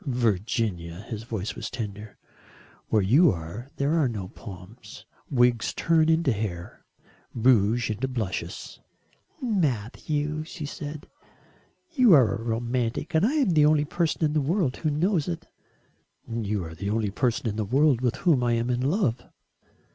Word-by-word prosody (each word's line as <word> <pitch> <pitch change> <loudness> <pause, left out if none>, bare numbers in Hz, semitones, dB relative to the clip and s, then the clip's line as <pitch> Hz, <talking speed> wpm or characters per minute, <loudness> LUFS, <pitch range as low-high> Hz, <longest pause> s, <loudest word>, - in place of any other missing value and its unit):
"Virginia," 105 -7 -1
his 110 -2 -4
voice 110 -3 -4
was 110 -3 -6
tender, 105 -3 -7 0.7
"where 110 -3 +2
you 140 - +5
are 85 - -7
there 140 +3 0
are 145 - +3
no 110 -4 -4
more 90 - -7
palms, 105 +3 -11 0.2
wigs 120 -4 +2
turn 160 -1 +3
into 160 -3 +3
hair, 100 -6 -5 0.5
rouge 115 -1 +3
into 115 +5 -2
blushes 115 -7 -4 0.3
" - - -36
"Matthew," 150 - -1
she 155 -1 -7
said, 145 +1 -7 0.9
"you 255 - +5
are 125 -7 +5
a 115 - -4
romantic 120 +6 -2
and 160 +2 +3
I 240 +7 +3
am 275 -11 +2
the 150 -2 +5
only 150 -1 +3
person 165 +1 -1
in 150 - 0
the 155 - +2
world 155 -2 0
who 155 - -1
knows 160 +2 +1
it." 170 -2 -4 0.8
"You 110 -4 -2
are 80 - -8
the 100 +5 -4
only 105 -1 0
person 125 +4 0
in 105 - -2
the 110 - -1
world 130 +3 +3
with 125 0 +1
whom 150 -8 +2
I 120 -1 +2
am 115 +2 0
in 120 0 0
love." 135 - +1
120 Hz, 160 wpm, -26 LUFS, 110-150 Hz, 0.9 s, you